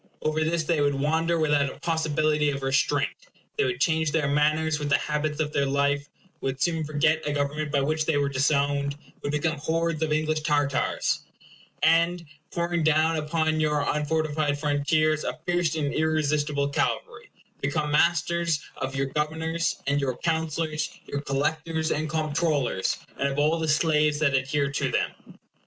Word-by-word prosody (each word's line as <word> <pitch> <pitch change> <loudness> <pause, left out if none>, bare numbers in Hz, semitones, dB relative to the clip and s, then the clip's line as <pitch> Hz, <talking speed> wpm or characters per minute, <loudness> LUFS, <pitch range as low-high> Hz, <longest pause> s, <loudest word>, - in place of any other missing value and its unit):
Over 155 +1 +1
this 160 +1 0
they 155 -1 +1
would 145 -1 +2
wander 160 +4 +1
without 145 -3 +2
a - - -13
possibility 155 -2 +1
of 140 -1 -3
restraint; 135 +1 +1 0.4
they 430 - +1
would 390 -1 -2
change 160 -3 +2
their 155 -2 +1
manners 150 +2 +2
with 145 -1 -3
the 140 - +5
habits 150 0 -2
of 150 -1 -1
their 140 -1 +1
life; 140 +1 0 0.3
would 135 0 -3
soon 165 0 +1
forget 155 +1 +1
a - - 0
government 145 +1 -2
by 140 -1 +2
which 155 +2 0
they 160 -3 +2
were 140 -1 +1
disowned; 140 +1 +1 0.2
would 145 - -2
become 155 +1 -1
hordes 165 +1 -1
of 160 -1 0
English 155 0 +1
Tartars; 145 -2 0 0.6
and, 170 +2 +3 0.2
pouring 170 0 -1
down 160 +1 +3
upon 155 +1 0
your 150 -1 +1
unfortified 150 -1 0
frontiers 155 +1 +1
a - - -3
fierce 175 -3 +1
and 145 -3 -1
irresistible 150 -2 +1
cavalry, 140 - -2 0.3
become 150 +1 -1
masters 170 0 +2 0.2
of 135 +1 -4
your 135 0 0
governors 160 +4 -2
and 140 +1 +1
your 130 -3 -1
counsellors, 160 -1 -2
your 140 - -4
collectors 160 +3 -1
and 155 +1 -1
comptrollers, 155 - 0 0.2
and 140 - +2
of 140 0 -3
all 155 +3 +2
the 160 - -1
slaves 150 -1 +3
that 145 -2 +2
adhered 140 +1 0
to - - 0
them. - - 0
155 Hz, 165 wpm, -26 LUFS, 145-160 Hz, 0.6 s, the